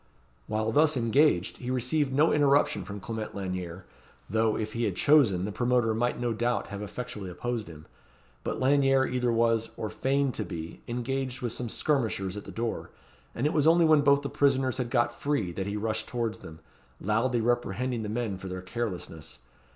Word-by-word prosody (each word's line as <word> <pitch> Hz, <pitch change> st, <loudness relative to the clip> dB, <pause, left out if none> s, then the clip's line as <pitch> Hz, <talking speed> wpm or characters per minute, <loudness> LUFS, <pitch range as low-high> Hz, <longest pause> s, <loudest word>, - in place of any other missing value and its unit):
While 110 Hz, +1 st, 0 dB
thus 150 Hz, +3 st, +4 dB
engaged, 115 Hz, -, +2 dB
he 125 Hz, -, -6 dB
received 130 Hz, +3 st, +1 dB
no 150 Hz, +5 st, +4 dB
interruption 145 Hz, -7 st, +3 dB
from 100 Hz, +1 st, -6 dB
Clement 110 Hz, +1 st, -5 dB
Lanyere, 90 Hz, -2 st, -5 dB, 0.4 s
though, 110 Hz, +1 st, +1 dB
if 110 Hz, 0 st, -3 dB
he 115 Hz, 0 st, 0 dB
had -, -, -1 dB
chosen, 120 Hz, -12 st, +4 dB
the 105 Hz, -, -3 dB
promoter 120 Hz, 0 st, +1 dB
might 120 Hz, +3 st, 0 dB
no 120 Hz, -1 st, 0 dB
doubt 120 Hz, +2 st, -1 dB
have 100 Hz, 0 st, -6 dB
effectually 105 Hz, -2 st, -6 dB
opposed 120 Hz, +4 st, -3 dB
him. 80 Hz, -2 st, -11 dB, 0.6 s
But -, -, -3 dB
Lanyere 135 Hz, 0 st, +4 dB
either 125 Hz, -2 st, 0 dB
was, 115 Hz, -1 st, +2 dB
or 110 Hz, -, -4 dB
feigned 135 Hz, 0 st, +1 dB
to -, -, -2 dB
be, 85 Hz, -2 st, -7 dB
engaged 130 Hz, +2 st, -3 dB
with 120 Hz, -, -1 dB
some 120 Hz, 0 st, -4 dB
skirmishers 110 Hz, -10 st, 0 dB
at 105 Hz, -, -7 dB
the -, -, -8 dB
door; 115 Hz, 0 st, -3 dB, 0.5 s
and 120 Hz, -, -1 dB
it 150 Hz, -, +2 dB
was 155 Hz, -1 st, +3 dB
only 170 Hz, +1 st, +6 dB
when 155 Hz, -2 st, +6 dB
both 140 Hz, 0 st, +4 dB
the 140 Hz, -, -3 dB
prisoners 135 Hz, -2 st, +2 dB
had 125 Hz, -2 st, -1 dB
got 120 Hz, 0 st, +2 dB
free, 140 Hz, -11 st, -1 dB
that 95 Hz, +3 st, -4 dB
he 100 Hz, +1 st, -2 dB
rushed 110 Hz, +1 st, -2 dB
towards 115 Hz, -3 st, -2 dB
them, 80 Hz, 0 st, -11 dB, 0.4 s
loudly 115 Hz, +5 st, +1 dB
reprehending 120 Hz, +1 st, 0 dB
the 105 Hz, -, -4 dB
men 110 Hz, -4 st, -2 dB
for 95 Hz, -, -7 dB
their 95 Hz, 0 st, -5 dB
carelessness. 90 Hz, -7 st, -5 dB
120 Hz, 190 wpm, -28 LUFS, 105-130 Hz, 0.6 s, only